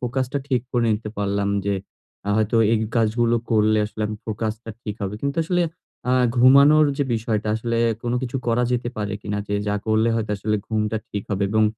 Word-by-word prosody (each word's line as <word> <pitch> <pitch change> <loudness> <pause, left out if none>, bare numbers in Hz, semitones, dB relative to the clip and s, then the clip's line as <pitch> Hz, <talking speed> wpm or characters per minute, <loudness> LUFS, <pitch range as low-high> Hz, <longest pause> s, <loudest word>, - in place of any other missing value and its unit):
ফোকাসটা 130 +2 -1
ঠিক 125 -3 +2
করে 120 -2 +2
নিতে 105 0 -5
পারলাম 100 0 0 0.2
যে 100 - +1 0.5
আ - - 0
হয়তো 110 +1 +1 0.2
এই 115 - +3 0.2
কাজগুলো 115 +1 +2
করলে 110 -1 +3
আসলে 105 0 -4 0.2
ফোকাসটা 110 +1 -4
ঠিক 105 - -4
হবে। 100 +1 -2
কিন্তু 140 +2 -2
আসলে 175 +1 +1 0.5
আ - - +3 0.2
ঘুমানোর 140 +5 +7
যে 145 - +1
বিষয়টা 110 -1 -1
আসলে 115 +1 -2 0.3
কোনো 120 0 0
কিছু 130 +1 -3
করা 120 +1 +2
যেতে 120 0 -1
পারে 105 -1 -2
কিনা 105 0 -3
যে 105 - -1
যা 105 - +1
করলে 110 +1 +3
হয়তো 110 -2 -2
আসলে 105 +2 0
ঘুমটা 110 0 -1
ঠিক 100 -1 -3
হবে 100 0 0
এবং 110 0 +3
110 Hz, 190 wpm, -23 LUFS, 105-120 Hz, 0.5 s, ঘুমানোর